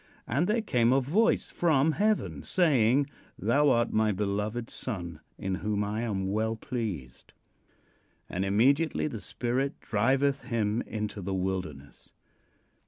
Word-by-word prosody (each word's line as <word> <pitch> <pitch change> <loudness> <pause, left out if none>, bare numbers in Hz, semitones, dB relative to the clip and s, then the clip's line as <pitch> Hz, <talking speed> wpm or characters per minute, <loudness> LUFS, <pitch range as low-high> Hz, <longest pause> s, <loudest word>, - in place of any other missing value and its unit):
"And 140 +10 0
there 220 +1 +1
came 120 - +2
a 135 - +5
voice 180 - +1
from 160 -3 +3
heaven, 210 +5 0
saying: 140 -6 +3 0.3
'Thou 145 0 +3
art 120 -2 +2
my 110 0 +3
beloved 105 +4 -2
Son, 85 -9 -5 0.2
in 95 - -3
whom 105 -1 0
I 105 +2 -2
am 95 -5 -2
well 110 +2 0
pleased.' 105 - -5 0.9
"And 95 - -2
immediately 135 +11 +2
the 115 -9 -4
Spirit 130 +3 -2
driveth 130 +5 +1
him 115 -2 0
into 105 -1 -4
the 95 +1 -3
wilderness." 90 -7 -5
115 Hz, 130 wpm, -29 LUFS, 100-135 Hz, 0.9 s, a